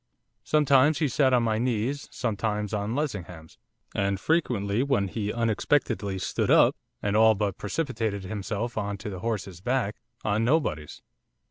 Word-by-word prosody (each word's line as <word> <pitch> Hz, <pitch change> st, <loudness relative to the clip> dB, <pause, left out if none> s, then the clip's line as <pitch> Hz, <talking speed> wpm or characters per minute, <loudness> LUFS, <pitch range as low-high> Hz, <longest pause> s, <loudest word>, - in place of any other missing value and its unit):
Sometimes 145 Hz, 0 st, +4 dB
he 150 Hz, -, +1 dB
sat 135 Hz, 0 st, +2 dB
on 125 Hz, -2 st, +3 dB
my 110 Hz, -1 st, +1 dB
knees, 125 Hz, +3 st, -1 dB
sometimes 105 Hz, -2 st, -2 dB
on 105 Hz, +2 st, -1 dB
Lessingham's, 90 Hz, -, -5 dB, 0.3 s
and 100 Hz, -1 st, 0 dB
frequently, 115 Hz, -9 st, +1 dB
when 135 Hz, -8 st, +1 dB
he 105 Hz, +1 st, -2 dB
unexpectedly 115 Hz, -2 st, 0 dB
stood 95 Hz, -, -1 dB
up, -, -, +6 dB, 0.3 s
and 100 Hz, 0 st, 0 dB
all 110 Hz, 0 st, +6 dB
but 100 Hz, -2 st, -2 dB
precipitated 110 Hz, -5 st, -2 dB
himself 105 Hz, +4 st, -3 dB
on 100 Hz, -1 st, -3 dB
to 105 Hz, +1 st, -6 dB
the 95 Hz, -, -6 dB
horse's 95 Hz, -5 st, -4 dB
back, 125 Hz, -2 st, -1 dB, 0.3 s
on 110 Hz, +1 st, +1 dB
nobody's. 115 Hz, -, 0 dB
110 Hz, 145 wpm, -27 LUFS, 100-130 Hz, 0.3 s, up